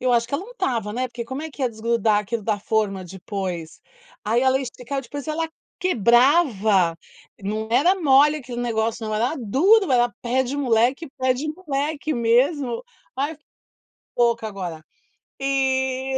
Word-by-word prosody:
eu 250 -1 +1
acho 235 -1 +3
que 245 - -4
ela 345 +7 -2
untava, 245 - -2
né, 255 +3 -1
porque 235 -1 -7
como 265 +5 -5
é 320 - -6
que 280 - -7
ia 255 - +3
desgrudar 220 -1 +1
aquilo 220 +2 -3
da 210 -1 0
forma 200 -3 -1
depois. 180 -2 -5 0.4
Aí 225 +3 +2
ela 265 0 +3
esticava 260 +1 -5
depois 280 +3 -8
e - - +1
ela 325 +1 -2 0.3
quebrava, 235 - +3 0.4
não 215 +2 -3
era 305 +11 +4
mole 295 0 +5
aquele 245 -3 -6
negócio 225 -1 -1
não, 215 - -2
era 240 +8 0
duro, 315 - +3
era 240 -1 +3
pé-de-moleque, 260 +2 +1
pé-de-moleque 295 +3 -1
mesmo. 245 - +1 0.3
Ai, 290 +4 -2
fi 300 - -41 0.7
boca 235 -2 +2
agora. 175 -6 -6 0.6
E 265 -1 0
245 Hz, 150 wpm, -23 LUFS, 220-280 Hz, 0.7 s, mole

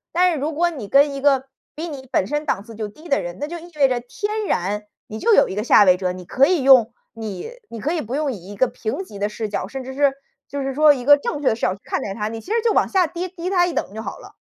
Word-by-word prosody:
但 360 +1 +4
是 320 - -1
如 300 +4 -2
果 345 +3 +2
你 265 -12 -7
跟 280 +4 +4
一 275 - -5
个 270 -2 +3 0.3
比 325 +3 -5
你 270 -4 -8
本 190 - +1
身 295 +5 -2
档 200 -9 -1
次 225 +1 -12
就 215 -1 -4
低 310 +11 -14
的 280 - +3
人， 175 +2 -6
那 290 - -3
就 345 - -6
意 345 +1 -12
味 275 -2 +5
着 250 -2 0
天 415 - -4
然， 205 - -1 0.2
你 215 - -7
就 455 - +3
有 - - +5
一 - - -5
个 210 - -1
下 210 -3 +6
位 180 -1 +5
者， 180 -1 -1
你 180 0 -8
可 260 +9 +3
以 345 -2 +2
用 255 -4 +6 0.2
你 220 - -6 0.2
你 230 - -7
可 305 +8 -1
以 335 - -1
不 235 +2 -7
用 290 0 0
以 195 -4 -9
一 - - -8
个 255 +6 +3
平 240 - -4
级 210 - -11
的 200 +1 0
视 215 0 -5
角， 195 - -3
甚 265 +5 -6
至 265 +1 -8
是， 280 -1 +3 0.3
就 285 0 -4
是 270 -1 -3
说 300 0 +6
一 255 -3 -5
个 290 +3 +7
正 290 +1 -4
确 280 - -1
的 - - +3
视 230 - -13
角 185 - +2
去 195 - -14
看 - - -2
待 195 - -4
她， 210 0 -3
你 225 +1 -5
其 380 - -10
实 460 0 +2
就 455 -1 +2
往 - - +3
下 370 -3 +2
低 350 +3 -4
低 365 0 -5
她 355 -2 +3
一 350 - -3
等 - - -2
就 220 - -5
好 - - -6
了。 - - -14
270 Hz, 340 characters per minute, -21 LUFS, 215-315 Hz, 0.3 s, 个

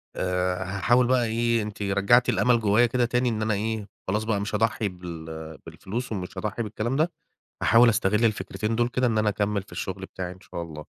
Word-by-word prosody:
آآ 90 0 -1
هاحاول 100 +6 +2
بقى 125 -1 +3
إيه، 115 0 +1
أنتِ 105 0 -6
رجّعتِ 100 +5 +3
الأمل 120 -2 +3
جوّايا 110 +3 +4
كده 120 +1 +1
تاني، 125 +1 +1
إن 110 -1 -2
أنا 110 -1 +1
إيه، 110 0 -2 0.2
خلاص 105 +3 0
بقى 110 -2 0
مش 105 +1 -3
هاضحّي 110 -1 +1
بال 80 -3 -8
بالفلوس 120 +5 -6
ومش 95 -1 -5
هاضحّي 105 +4 -2
بالكلام 110 +4 -3
ده، 160 +4 +2 0.5
هاحاول 115 +2 +6
أستغل 105 0 +2
الفكرتين 110 0 -1
دُول 120 +1 +2
كده 125 +1 +1
إن 110 -2 0
أنا 105 -1 +3
أكمّل 105 0 0
في - - -20
الشُغل 95 0 -5
بتاعي 90 -1 -6
إن 90 - -13
شاء 85 - -7
الله. 75 -2 -8
105 Hz, 200 wpm, -26 LUFS, 95-115 Hz, 0.5 s, هاحاول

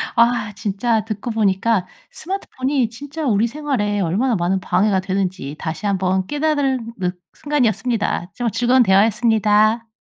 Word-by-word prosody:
아 235 -3 +2
진짜 215 +2 -1
듣고 220 +2 -4
보니까 200 -2 +1 0.2
스마트폰이 275 - -2
진짜 285 +6 -7
우리 225 -2 +2
생활에 235 -7 -2
얼마나 210 +8 +1
많은 180 +2 0
방해가 195 +1 +1
되는지 185 -6 -3
다시 160 +5 -5
한번 190 -1 0
깨달은 285 -6 -1
늑 180 -1 -3
순간이었습니다. 235 -9 -1
정말 240 -2 -1
즐거운 245 +3 +3
대화였습니다. 215 +2 +3
220 Hz, 340 characters per minute, -20 LUFS, 195-245 Hz, 0.2 s, 즐거운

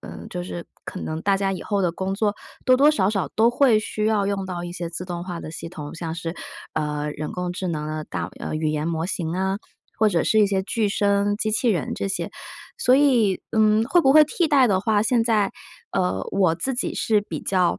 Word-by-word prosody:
嗯， 85 +1 -9
就 180 - -4
是 175 -1 -6 0.2
可 - - -6
能 155 0 -4
大 200 -1 +3
家 195 0 0
以 190 - -5
后 200 -2 0
的 175 - +1
工 190 +2 -3
作， 210 0 0 0.3
多 255 - +6
多 285 +3 +6
少 205 -10 +2
少 195 -3 -1
都 225 +2 +5
会 240 -3 +4
需 215 0 -2
要 210 -2 +2
用 195 -1 -2
到 175 -1 -4
一 175 - -6
些 175 -1 -4
自 170 +2 -6
动 175 -1 -5
化 175 -2 -5
的 - - -7
系 165 +1 -7
统， 155 -4 -8
像 165 -1 -4
是， 165 0 -5 0.4
呃， 150 -1 -2
人 150 +1 -5
工 180 -1 -3
智 185 +1 -4
能 150 -3 -3
的 155 0 -3
大 - - -4
呃， - - -4
语 155 0 0
言 155 +1 -1
模 165 0 -1
型 170 -3 -3
啊， 190 +1 0 0.4
或 220 - +4
者 170 -5 +1
是 220 - +3
一 210 - +5
些 195 -1 +1
具 215 +1 0
声 200 0 +1
机 215 +1 -1
器 235 +3 +1
人 180 -9 0
这 195 - -3
些。 195 - -3 0.4
所 260 - +4
以， 245 -9 +3
嗯， 215 0 +4
会 315 +9 +4
不 270 -4 +4
会 305 +1 +8
替 325 +2 0
代 275 -4 +5
的 190 -3 +2
话， 210 0 +2
现 240 -1 +3
在， 215 -4 +1 0.4
呃， 95 +1 0
我 185 -4 +3
自 260 +10 -2
己 245 - -2
是 215 -2 +2
比 205 - -6
较 185 -2 +1
195 Hz, 255 characters per minute, -23 LUFS, 170-220 Hz, 0.4 s, 会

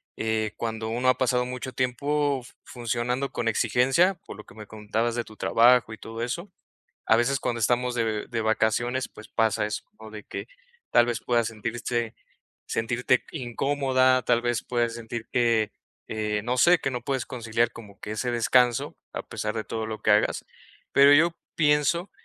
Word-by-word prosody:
eh, 110 -1 -1
cuando 110 -1 -3
uno 125 +3 +1
ha 125 - +3
pasado 125 -1 +2
mucho 125 +1 -6
tiempo, 140 +2 0 0.2
funcionando 125 +2 -2
con 115 - -3
exigencia, 130 - +3
por - - -8
lo 105 - -11
que - - -17
me 110 -1 -9
contabas 110 +2 -2
de 120 0 -2
tu 110 - -14
trabajo 120 -1 +4
y 110 - -9
todo 115 +1 -6
eso, 170 +11 -4 0.5
a 110 - +5
veces 130 +3 +1
cuando 120 -2 -2
estamos 125 +2 +1
de 110 -3 -1
de 115 -2 -2
vacaciones, 110 +4 +1
pues, 110 - -13
pasa 110 -2 +1
eso, 105 +4 -4 0.2
¿no?, 110 0 -10
de 105 -1 -9
que - - -7 0.4
tal 120 - +5
vez, 120 -2 -2
puedas 120 -1 +1
sentirse 115 +1 -3 0.5
sentirte 125 +2 0
incómoda, 130 -1 +1
tal 120 -1 +2
vez 120 -2 0
puedas 120 -1 -1
sentir 115 0 -6
que, 115 -3 +2 0.4
eh, 105 -1 -2
no 125 +1 -1
sé, 175 +5 +6
que 135 - -1
no 125 -2 -3
puedes 130 0 -2
conciliar 115 -1 -1
como 105 -4 -13
que 105 - -7
ese 120 +3 -2
descanso 120 0 +2 0.2
a - - -3
pesar 105 0 -4
de 110 -1 -3
todo 110 -1 -4
lo 110 -1 -6
que 105 - +2
hagas, 105 +1 +2 0.5
pero 140 +1 +7
yo 165 +3 +4 0.2
pienso 150 +4 +2
120 Hz, 180 wpm, -26 LUFS, 110-130 Hz, 0.5 s, pero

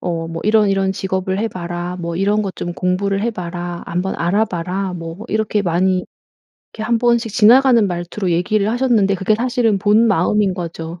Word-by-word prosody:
어 165 -2 -3
뭐 165 0 -5
"이런 215 -1 +4
이런 195 -1 +1
직업을 190 0 -2
해봐라. 175 -4 -4
뭐 170 -1 -4
이런 205 +4 +1
것 195 -3 -4
좀 175 - -5
공부를 195 +2 -1
해봐라. 175 -5 -4
한번 180 +2 -2
알아봐라." 185 0 -1
뭐 165 +1 -7
이렇게 215 -1 0
많이 180 +1 +1 0.7
이렇게 220 - -6
한번씩 235 0 +1
지나가는 240 0 +5
말투로 180 +1 -3
얘기를 200 +5 +1
하셨는데 230 -5 +2
그게 195 +3 +1
사실은 240 -3 +1
본마음인 210 -1 +2
거죠. 170 -1 -6
195 Hz, 360 characters per minute, -18 LUFS, 175-215 Hz, 0.7 s, 지나가는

